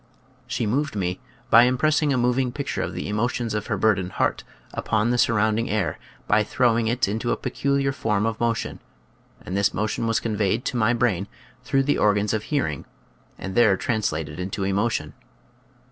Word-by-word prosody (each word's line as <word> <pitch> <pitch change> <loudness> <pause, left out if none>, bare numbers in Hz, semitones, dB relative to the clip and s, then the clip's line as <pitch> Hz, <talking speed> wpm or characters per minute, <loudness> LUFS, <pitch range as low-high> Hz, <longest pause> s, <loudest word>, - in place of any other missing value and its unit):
She 115 - -2
moved 140 +6 -1
me 90 -2 -2 0.3
by 120 +2 +8
im 125 +1 +1
pressing 155 +1 +2
a 135 - +2
moving 125 +1 +1
picture 140 +2 -3
of - - -3
the - - -4
emotions 115 +2 -1
of 105 -1 -3
her - - -1
burdened 95 -4 +1
heart - - 0 0.3
upon 110 +1 0
the 125 - +1
surrounding 110 0 +2
air 105 -4 -1 0.3
by 105 0 +4
throwing 115 0 +1
it 120 +1 +1
into 110 +4 -1
a - - 0
peculiar 140 0 0
form 105 -5 0
of 115 0 -2
mo 115 -1 +2
tion, - - -5 0.7
and 90 - -4
this 100 0 +1
motion 110 +2 -1
was 115 0 +2
conveyed 110 +1 -1
to - - -2
my 115 0 +3
brain 110 -6 0 0.4
through 135 0 +1
the 145 +2 +1
organs 105 0 +2
of 110 -1 -2
hearing 100 - -1 0.5
and 95 - -6
there 110 -4 +4
translated 90 -9 -2
into 95 +2 -3
emotion. 100 -5 -1
110 Hz, 180 wpm, -24 LUFS, 100-120 Hz, 0.7 s, by